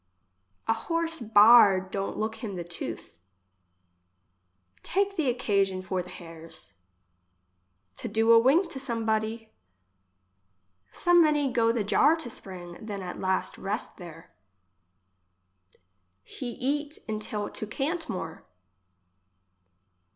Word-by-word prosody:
A 225 Hz, -, +4 dB
horse 330 Hz, +7 st, -2 dB
baared 210 Hz, -4 st, +6 dB
don't 195 Hz, 0 st, -3 dB
look 220 Hz, +1 st, -2 dB
him 205 Hz, -4 st, -4 dB
the 175 Hz, -, -4 dB
tooth. 115 Hz, -, -7 dB, 1.6 s
Take 395 Hz, +1 st, 0 dB
the 315 Hz, -7 st, +1 dB
occasion 195 Hz, -6 st, 0 dB
for 185 Hz, -1 st, -2 dB
the 180 Hz, -, -10 dB
hairs. 165 Hz, -, -9 dB, 1.2 s
To -, -, -4 dB
do 225 Hz, +2 st, +2 dB
a 230 Hz, -, +9 dB
wink 285 Hz, +10 st, +4 dB
to 265 Hz, -, -4 dB
some 235 Hz, -4 st, -2 dB
body. 220 Hz, 0 st, -1 dB, 1.4 s
So 350 Hz, -, +1 dB
many 300 Hz, -5 st, +4 dB
go 230 Hz, -2 st, +3 dB
the 230 Hz, -2 st, -1 dB
jar 290 Hz, +10 st, +4 dB
to 285 Hz, -8 st, -6 dB
spring, 180 Hz, -2 st, -8 dB
than 205 Hz, -3 st, -5 dB
at 180 Hz, -, -6 dB
last 190 Hz, 0 st, -1 dB
rest 205 Hz, +4 st, -4 dB
there. 170 Hz, -2 st, -12 dB, 1.9 s
He 245 Hz, -, -6 dB
eat 290 Hz, +4 st, -2 dB
untill 215 Hz, -1 st, -3 dB
to 215 Hz, -, -5 dB
can't 315 Hz, -, -3 dB
more. 165 Hz, -3 st, -5 dB
220 Hz, 115 wpm, -27 LUFS, 190-265 Hz, 1.9 s, a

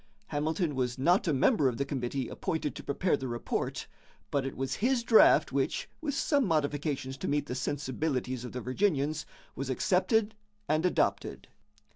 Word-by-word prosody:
Hamilton 155 Hz, +2 st, -1 dB
was 125 Hz, -1 st, -1 dB
not 175 Hz, +8 st, +3 dB
a -, -, +3 dB
member 145 Hz, -, +3 dB
of 120 Hz, -3 st, -1 dB
the 140 Hz, -, -1 dB
committee 135 Hz, -2 st, -3 dB
appointed 160 Hz, -5 st, -3 dB
to -, -, -9 dB
prepare 170 Hz, +5 st, +1 dB
the 135 Hz, -2 st, -5 dB
report, 120 Hz, -1 st, -3 dB, 0.5 s
but 140 Hz, -1 st, 0 dB
it -, -, -7 dB
was 135 Hz, 0 st, -2 dB
his 245 Hz, +1 st, +1 dB
draft 230 Hz, -2 st, +6 dB
which, -, -, -1 dB
with 290 Hz, -3 st, -2 dB
some 285 Hz, -1 st, +2 dB
modifications 145 Hz, -, -1 dB
to -, -, -4 dB
meet 145 Hz, 0 st, 0 dB
the 125 Hz, -, -5 dB
sensibilities 130 Hz, -1 st, -2 dB
of 125 Hz, -, -6 dB
the 125 Hz, -, -5 dB
Virginians, 150 Hz, +1 st, 0 dB, 0.3 s
was 135 Hz, 0 st, -4 dB
accepted 195 Hz, -, +2 dB, 0.3 s
and 155 Hz, +4 st, +2 dB
adopted. -, -, -1 dB
145 Hz, 165 wpm, -30 LUFS, 130-180 Hz, 0.5 s, draft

